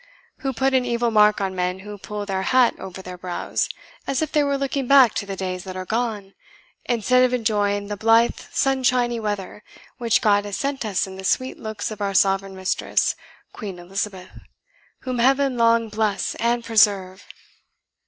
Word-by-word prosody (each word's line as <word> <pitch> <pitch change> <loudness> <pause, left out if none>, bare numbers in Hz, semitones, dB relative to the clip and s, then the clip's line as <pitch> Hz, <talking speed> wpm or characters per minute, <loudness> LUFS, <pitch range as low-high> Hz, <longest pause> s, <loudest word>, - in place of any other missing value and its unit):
who 270 - -2
put 265 +2 0
an 260 -1 +3
evil 235 -1 0
mark 210 -1 +5
on 195 -1 -2
men 180 +1 -2
who 210 +1 -8
pull 205 +1 -6
their 190 -1 -2
hat 255 +3 +3
over 190 0 -8
their 180 -1 -9
brows, 180 -1 -2 0.4
as 270 - 0
if 310 - -4
they 300 - +3
were 280 -1 0
looking 275 -1 -2
back 265 -5 +6
to 200 - -3
the 195 - -4
days 185 -1 -4
that 185 -1 -8
are 185 0 -5
gone, 215 -3 -2 0.5
instead 250 +2 +3
of 250 0 +2
enjoying 205 -3 0
the 205 0 -4
blithe 225 +3 +3
sunshiny 250 -3 +1
weather 210 -1 -4 0.4
which 235 -1 +2
God 205 -2 +3
has 205 -1 -4
sent 275 -3 -2
us 200 -3 0
in 190 0 -10
the 190 - -8
sweet 255 +7 -1
looks 215 -1 -5
of 215 -1 -8
our 200 -1 -1
sovereign 195 0 +2
mistress, 190 0 0 0.4
Queen 195 -4 -7
Elizabeth, 190 +1 -5 0.7
whom 255 -2 -3
Heaven 270 +2 +3
long 230 -1 +3
bless 210 -3 -1
and 235 +1 +1
preserve!" 200 -4 +2
210 Hz, 180 wpm, -22 LUFS, 195-245 Hz, 0.7 s, back